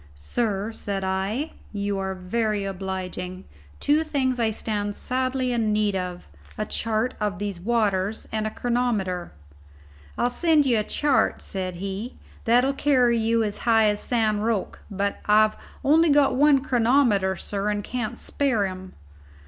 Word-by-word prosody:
"Sir," 205 - -2
said 200 -3 -4
I, 195 +10 -1 0.2
"you 200 -1 -2
are 190 0 -2
very 205 +2 -1
obliging. 185 -1 -5 0.4
Two 300 +2 +3
things 265 -5 0
I 225 -1 +2
stand 205 -1 -3
sadly 255 0 -1
in 225 -3 +1
need 210 -1 +1
of: 180 -1 -4 0.3
a 215 - -1
chart 225 +3 0
of 210 -4 -1
these 200 -2 -4
waters 210 -1 0
and 215 0 -1
a - - -1
chronometer." 215 -7 -1 0.9
"I'll 245 - +1
send 315 +1 +3
you 240 -4 +3
a - - 0
chart," 290 +4 +1
said 185 -2 -5
he, 195 +6 -5 0.3
"that'll 245 +4 +4
carry 250 -5 +3
you 225 0 +2
as 210 -1 -3
high 225 -2 +4
as 205 0 0
San 220 -4 +1
Roque; 215 -2 -1
but 200 0 -2
I've 215 +1 +5 0.3
only 320 +4 +5
got 285 -2 +4
one 275 0 +4
chronometer, 235 -7 +3
sir, 200 +2 -2
and 205 0 -1
can't 235 0 -4
spare 250 -8 0
him." 185 0 -7
215 Hz, 150 wpm, -24 LUFS, 195-245 Hz, 0.9 s, I've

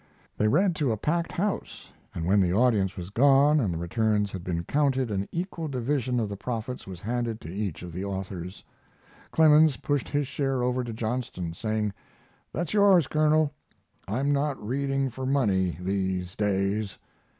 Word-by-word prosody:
They 105 - +1
read 180 - +3
to 140 -6 +1
a 110 - -1
packed 165 +9 -1
house, 190 +3 -3 0.2
and 80 - -3
when 100 +3 +4
the 90 -2 +2
audience 105 -3 +2
was 90 +1 -6
gone 140 +5 +5
and 105 -9 0
the 85 - -3
returns 105 +3 0
had 95 -3 -6
been 85 -2 -2
counted 135 - +1
an 100 -1 -2
equal 170 -2 -3
division 130 -2 -1
of 110 - 0
the 100 - -5
profits 120 +3 -5
was 90 -2 -8
handed 115 0 -2
to 80 - -8
each 100 -5 -3
of 90 - -7
the 90 +3 -4
authors. 95 -2 -5 0.7
Clemens 155 -3 +5
pushed 145 +3 -1
his 145 -1 0
share 135 -2 -1
over 125 0 0
to 120 - -5
Johnston, 110 -7 -3
saying: 110 +2 -2 0.6
"That's 170 +2 -3
yours, 200 -6 +5
Colonel. 155 0 +2 0.5
I'm 135 +8 0
not 140 -1 0
reading 135 +3 -1
for 130 +2 -5
money 100 - +1
these 95 -1 -2
days." 100 0 0
115 Hz, 170 wpm, -27 LUFS, 95-140 Hz, 0.7 s, gone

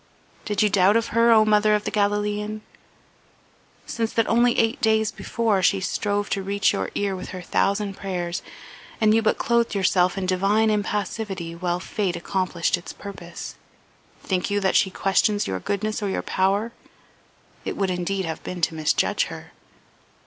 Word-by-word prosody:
Did 210 -1 +1
you 210 - +4
doubt 195 +3 +4
of 230 0 -1
her, 230 +1 +4
O 220 -1 +6
mother 210 0 +4
of 210 - -1
the - - -3
Galilean? 210 +1 -1 1.2
Since 225 -1 -3
that 230 - +2
only 240 +1 +3
eight 225 +2 +1
days 220 -1 +2
before 220 -4 0
she 195 +1 +3
strove 205 +2 -1
to 195 - 0
reach 200 +1 +1
your - - -2
ear 200 -1 0
with 185 - -7
her 185 - -6
thousand 200 +3 0
prayers, 180 -3 -3 0.6
and 215 -1 +4
you 225 - +4
but 220 - +1
clothed 235 -2 +1
yourself 185 -1 +2
in 190 - -2
divine 200 +4 +2
impassivity 205 -4 -2
while 175 +1 -2
fate 190 -1 -2
accomplished 175 0 -1
its 175 - -9
purpose, 180 -4 -8 0.7
think 185 0 -1
you 205 0 +1
that 190 -2 +1
she 190 - +4
questions 200 +3 +1
your 95 -1 -3
goodness 215 - -2
or 205 - -1
your - - -2
power? 200 +4 0 0.9
It - - -4
would 195 -2 0
indeed 185 +2 -2
have 160 -1 -5
been 180 -1 -6
to 165 - +1
misjudge 155 -1 +1
her. - - -9
200 Hz, 170 wpm, -24 LUFS, 185-215 Hz, 1.2 s, O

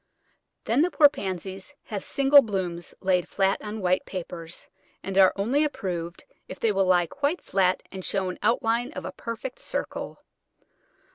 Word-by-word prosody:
Then 240 +6 +2
the 345 - +3
poor 295 -2 +6
Pansies 190 - -6
have 205 -3 -5
single 280 +1 +6
blooms 185 -7 -4
laid 185 -2 +2
flat 195 0 +1
on 215 0 -5
white 185 0 +2
papers, 170 -2 -7 0.4
and 195 - -4
are 190 -1 +7
only 240 +10 +2
approved 175 - -4 0.2
if 185 - -8
they 225 - +2
will 195 -2 +1
lie 180 -1 +4
quite 285 - -1
flat 185 -1 +1
and 190 -1 -7
show 195 0 -1
an - - -10
outline 235 +2 +1
of - - -6
a - - -4
perfect 230 +3 -6
circle. - - -5
195 Hz, 160 wpm, -26 LUFS, 185-235 Hz, 0.4 s, are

